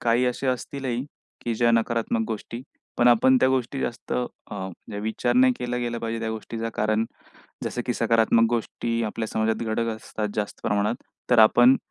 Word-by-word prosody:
काही 120 +2 +2
असे 125 +2 -2
असतीलही, 130 0 -2 0.4
की 120 -1 0
ज्या 120 +1 +3
नकारात्मक 115 0 +1
गोष्टी, 115 +1 -5 0.4
पण 120 - +6
आपण 125 +2 +5
त्या 130 - +5
गोष्टी 130 +1 -1
जास्त 120 - -4 0.4
अ, 95 -2 -4 0.2
जे 100 -1 -4
विचार 110 +3 -1
नाही 130 +1 +6
केला 125 0 -2
गेला 120 -1 -2
पाहिजे 115 0 -3
त्या 110 -1 -2
गोष्टीचा. 115 +1 -4
कारण 110 +1 +1 0.6
जसं, 120 - -3
की 120 - 0
सकारात्मक 115 0 +3
गोष्टी 115 0 -1
आपल्या 110 +1 -3
समाजात 110 +1 0
घडत 115 +1 0
असतात 110 -1 -4
जास्त 105 -1 -3
प्रमाणात. 105 +2 +1 0.4
तर 125 - +5
आपण 120 +4 +7
115 Hz, 170 wpm, -25 LUFS, 110-120 Hz, 0.6 s, आपण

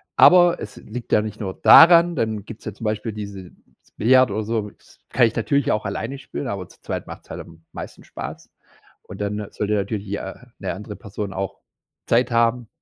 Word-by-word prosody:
Aber, 175 -1 +7
es 105 - -8
liegt 120 +2 -8
ja 105 - +5
nicht 110 0 -6
nur 95 -3 -4
daran, 170 0 +8
dann 110 -5 -1
gibt's 115 -2 -11
ja 110 - -4
zum 110 - -9
Beispiel 110 +1 -2
dieses 100 -3 -8 0.5
Billiard 130 0 +5
oder 110 +2 -2
so, 110 -1 -2
das - - -24
kann 120 -2 +4
ich 110 - -5
natürlich 140 +5 +1
auch 105 0 -1
alleine 135 +7 -4
spielen, 135 0 -6
aber 100 -4 -4
zu - - -20
zweit - - -4
macht - - -9
es - - -26
halt - - -6
am 85 0 -15
meisten - - -9
Spaß - - -8 0.5
und 95 +2 -10
dann 105 0 -3
sollte 105 0 -2
natürlich 100 0 -2
die, 100 - -2
äh 95 - -6 0.3
‘ne 95 - -3
andere 105 +1 -8
Person 100 -1 -6
auch 95 0 -5 0.5
Zeit 120 +1 +2
haben 115 0 +2
105 Hz, 205 wpm, -22 LUFS, 100-120 Hz, 0.5 s, daran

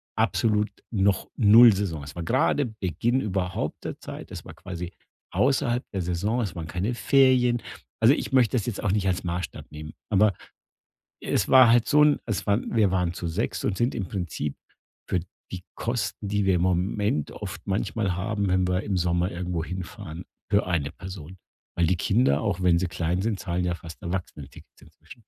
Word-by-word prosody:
absolut 105 -2 +1 0.2
noch 100 -3 +1
null 115 +1 +8
Saison. 85 -7 -3
Es 70 +2 -10
war 85 - -4
grade 130 - +2
Beginn 105 - 0
überhaupt 95 -2 -3
der - - -5
Zeit. - - -9
Es - - -8
war - - -10
quasi 90 -2 -7 0.4
außerhalb 125 -2 +1
der 95 -2 -2
Saison. 100 +8 -1
Es 100 -7 -3
waren 80 -2 -5
keine 95 +9 -2
Ferien. 125 -2 +3 0.4
Also, 115 +5 +6
ich - - -3
möchte 130 -2 +3
das 110 - -2
jetzt 110 - -4
auch 100 - +1
nicht 100 -1 0
als 90 0 0
Maßstab 85 -2 -4
nehmen. 75 0 -8 0.2
Aber, 105 0 +4 0.9
es - - 0
war 130 -2 +7
halt 120 -1 +4
so 150 0 +5
'n 150 -1 +4
es 110 -5 -2
waren 105 +4 0
wir 105 -4 +4
waren 90 -2 0
zu 85 - -5
sechst 90 +8 -2
und 95 - -1
sind 120 +2 +1
im 95 -6 -3
Prinzip 85 -6 -4 0.5
für 90 - +1 0.3
die 90 -2 -6
Kosten, 110 -3 -3
die 105 0 0
wir 95 - +3
im 85 - +1
Moment 90 -1 0
oft - - -7
manchmal 100 -1 -1
haben, 100 +1 -1
wenn 95 0 +2
wir 90 +2 0
im 100 -3 -2
Sommer 90 +1 +1
irgendwo 85 -2 -3
hinfahren 90 -1 -7 0.3
für 100 0 +3
eine 80 -5 -1
Person. 90 -2 -9 0.4
Weil 85 -1 +2
die 90 - +2
Kinder, 100 - +2
auch 95 -3 -1
wenn 85 -2 +4
sie 95 - -1
klein 90 0 -1
sind, 105 -1 -1
zahlen 90 -1 -2
ja 85 -1 0
fast 85 -2 -11
Erwachsenentickets 85 -6 -7
inzwischen. - - -16
95 Hz, 190 wpm, -26 LUFS, 90-110 Hz, 0.9 s, null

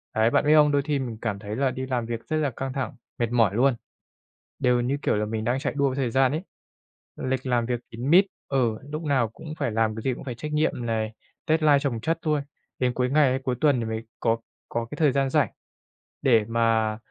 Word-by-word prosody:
Đấy, 110 +1 +4
bạn 135 - +2
biết 150 +1 +6
không, 150 -1 +6
đôi 145 -1 +3
thi 145 -1 -1
mình 120 -4 -4
cảm 105 -3 -2
thấy 105 +1 -5
là 135 +1 +1
đi 130 +1 -4
làm 125 -3 -1
việc 115 0 -5
rất 155 - 0
là 150 -2 +1
căng 130 +1 -5
thẳng, 135 0 -3 0.2
mệt 120 -1 0
mỏi 115 -5 +3
luôn, 130 +2 +3 0.8
đều 125 -2 +3
như 130 +4 0
kiểu - - +1
là 105 0 0
mình 110 0 -3
đang 120 +4 0
chạy - - -2
đua 140 - +3
với 130 - -1
thời 130 -4 -1
gian 130 0 +3
ấy. 155 +3 -1 0.8
Lịch 130 0 -2
làm 120 -2 +1
việc 120 0 -1
kín 120 +4 -4
mít 185 +5 +7 0.2
ừ, 120 -5 +1
lúc 155 +2 -4
nào 135 -7 +1
cũng 155 +8 -9
phải - - 0
làm, 110 0 +1
cái 110 - -5
gì 130 - +1
cũng - - -9
phải 130 -3 -5
trách 150 +5 -6
nhiệm 150 -5 0
này, 110 -1 -1 0.3
deadline 155 -2 +4
chồng 125 -6 -2
chất 165 +6 0
luôn, 150 -2 +2 0.4
đến 125 -1 +1
cuối 125 0 0
ngày 145 0 +4
hay 130 +1 0
cuối 130 -1 0
tuần 145 -5 +4
thì 115 - -2
mới 110 0 -3 0.2
có 115 -1 +2 0.3
có 115 0 -2
cái - - -4
thời 150 -3 +4
gian 135 0 +1
rảnh - - +2 0.7
để 115 -5 +4
mà 115 -1 +1
125 Hz, 245 wpm, -25 LUFS, 115-140 Hz, 0.8 s, mít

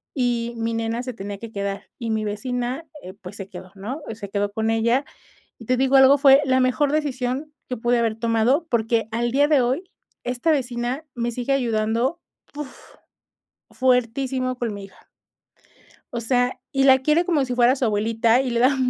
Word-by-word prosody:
y 240 -2 0
mi 230 0 -2
nena 230 +1 -2
se 255 0 -5
tenía 200 -2 -6
que 230 0 -8
quedar, 200 -1 -4
y 230 -2 -4
mi 220 0 0
vecina, 245 +7 -3 0.2
eh, 185 - -9
pues, 185 +2 -9
se 195 -1 -8
quedó, 185 0 -10
¿no?, 230 +10 -6
se 205 -2 -8
quedó 205 0 -1
con 220 +1 -1
ella, 235 +5 +2 0.5
y 230 - -11
te 255 +1 +1
digo 265 +1 +2
algo, 270 +1 +7
fue 275 0 +7
la 260 -1 +3
mejor 260 +3 +2
decisión 285 0 -2 0.2
que 250 - -3
pude 240 +1 +1
haber 225 -2 0
tomado, 235 +8 +2
porque 225 -1 +1
al 235 +1 -1
día 285 +2 +3
de 295 -4 +4
hoy 260 +9 0 0.4
esta 250 +6 0
vecina 255 +1 -2
me 240 0 -1
sigue 250 +3 -1
ayudando, 235 +5 0 0.3
¡uf!, 295 -3 -9 0.8
fuertísimo, 255 +1 0
con 235 -3 -2
mi 200 -1 -7
hija. 195 - -20 1.1
O 235 - -2
sea, 245 +2 +1
y 270 0 +2
la 265 -1 +6
quiere 305 +6 +2
como 315 -6 +1
si 250 -1 -3
fuera 245 +1 +4
su 260 - -2
abuelita 225 +3 +2
y 265 - -1
le 235 0 0
da 265 +3 +4
245 Hz, 185 wpm, -23 LUFS, 225-265 Hz, 1.1 s, algo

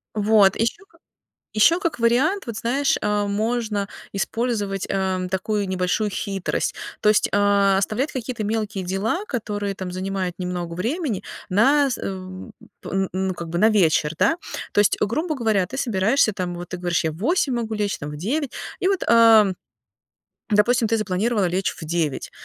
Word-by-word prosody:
Вот, 210 -2 +4
ещё 230 - -1
как - - -25 0.5
ещё 330 - +4
как 335 -8 -2
вариант, 255 - +2
вот, 230 -2 -5
знаешь, 275 +4 +1
э, 210 0 0
можно 215 0 -1 0.2
использовать, 205 -2 -2
э, 190 -1 -1
такую 200 +2 -1
небольшую 185 +3 0
хитрость, 195 -1 -2 0.3
то - - +2
есть, 210 - +3
а, 200 -1 +3
оставлять 220 +9 -1
какие-то 245 -3 -4
мелкие 210 -2 -2
дела, 205 - -1
которые 205 - -3
там 185 -1 -6
занимают 185 -1 -3
немного 180 -2 -4
времени 235 - -2 0.3
на 275 +9 +4
с 255 - -2
э - - -11 0.8
п - - -8
н 195 0 0
ну, 190 0 0
как 170 -1 -7
бы 170 - -4
на 215 +4 +5
вечер, 160 -7 +3
да. 325 - +3 0.4
То 205 - +4
есть, 205 - +3
грубо 310 - 0
говоря, 220 -8 +1
ты 255 +8 -7
собираешься 225 0 +2
там 180 -3 -3
вот 175 0 -7
ты 185 - -5
говоришь: 175 -2 -1
"Я 160 - +1
в - - -11
8 265 - +1
могу 230 -2 -3
лечь, 205 -1 -1
там 145 - -5
в 150 - -7
9". 270 - -2 0.3
И 370 - +2
вот, 390 -2 0
а, 225 -2 +7 1.0
допустим, 225 +3 +3
ты 225 +1 +1
запланировала 210 +1 0
лечь 185 +2 0
в - - -6
9, 160 -4 -2
210 Hz, 175 wpm, -22 LUFS, 190-235 Hz, 1.0 s, а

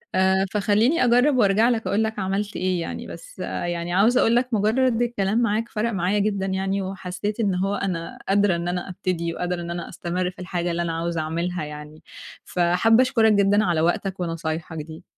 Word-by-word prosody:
آآ، 190 +1 +3
فخلّيني 215 +9 +2
أجرّب 250 +3 +4
وأرجَع 215 +1 +4
لك 225 -5 -1
أقول 200 +4 +1
لك 220 -1 -3
عملت 195 +2 -2
إيه 185 -1 0
يعني، 165 - -5
بس - - -11
يعني 175 0 -3
عاوزة 220 +7 +4
أقول 230 - +3
لك 245 +1 +1
مجرّد 225 +3 +2
الكلام 225 -3 0
معاك 225 0 0
فَرَق 230 +2 -1
معايا 190 +1 0
جدًا 200 -1 0
يعني 195 +1 -1
وحسيت 190 +3 -4
إن 200 -5 +1
هو 195 +2 0
أنا 180 -4 -4
قادرة 200 -2 +3
إن 170 0 -3
أنا 180 +1 -3
أبتدي 180 -2 -2
وقادرة 180 0 -3
إن 170 - -5
أنا 170 0 -5
أستمرّ 180 +1 -3
في 180 - -20
الحاجة 175 -1 -2
اللي 170 +1 -1
أنا 170 -1 -2
عاوزة 170 0 -2
أعملها 170 +2 -2
يعني، 150 +1 -10 0.4
فحابة 180 +7 +3
أشكرك 225 -4 +3
جدًا 205 +1 +3
على 170 -3 +1
وقتك 185 +3 0
ونصايحك 165 -1 -4
دي. 160 +3 -8
190 Hz, 190 wpm, -23 LUFS, 175-215 Hz, 0.4 s, أجرّب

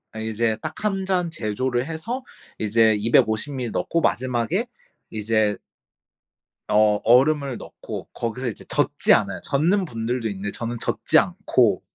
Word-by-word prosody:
어 - - -5
이제 110 0 -1
딱 155 - -4
1 195 -2 0
잔 180 -3 0
제조를 125 -2 -2
해서 185 - -4 0.3
이제 110 +1 +3
250 110 +4 +2
밀리 125 -3 -3
넣고 165 +8 -1
마지막에 130 - 0 0.5
이제 110 -1 +1 1.1
어 105 0 +4
얼음을 135 +2 +3
넣고 - - -8
거기서 120 +2 -3
이제 110 - -5
젓지 - - +2
않아요. - - +1
젓는 175 +8 +1
분들도 115 -3 -2
있는데 100 0 -4
저는 120 +2 -4
젓지 - - +1
않고 - - +2
120 Hz, 260 characters per minute, -23 LUFS, 110-155 Hz, 1.1 s, 어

